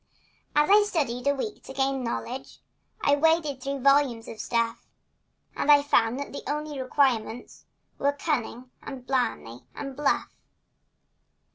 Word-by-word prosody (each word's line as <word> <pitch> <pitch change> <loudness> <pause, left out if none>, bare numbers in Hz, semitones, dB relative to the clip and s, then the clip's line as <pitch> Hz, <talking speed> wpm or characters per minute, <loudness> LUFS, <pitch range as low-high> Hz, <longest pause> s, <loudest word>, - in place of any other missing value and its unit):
Then 295 0 +4
I 415 +1 +7
studied 275 - -1
a 285 - +3
week 420 +10 -5
to - - -8
gain 270 -1 0
knowledge, 250 +2 -5 0.5
And 285 0 +3
waded 315 -4 +2
through 275 0 -3
volumes 275 -4 +3
of 220 - -9
stuff, 230 -1 -1 0.7
And 295 - +3
I 290 -1 +7
found 240 -4 +2
that 285 - -6
the - - -5
only 300 -2 -3
requirements 255 -3 0 0.3
Were 280 - +3
cunning 255 -4 -3
and 260 -3 -8
blarney 235 - -2
and 275 -1 -6
bluff. 290 +1 0
275 Hz, 140 wpm, -26 LUFS, 245-290 Hz, 0.7 s, I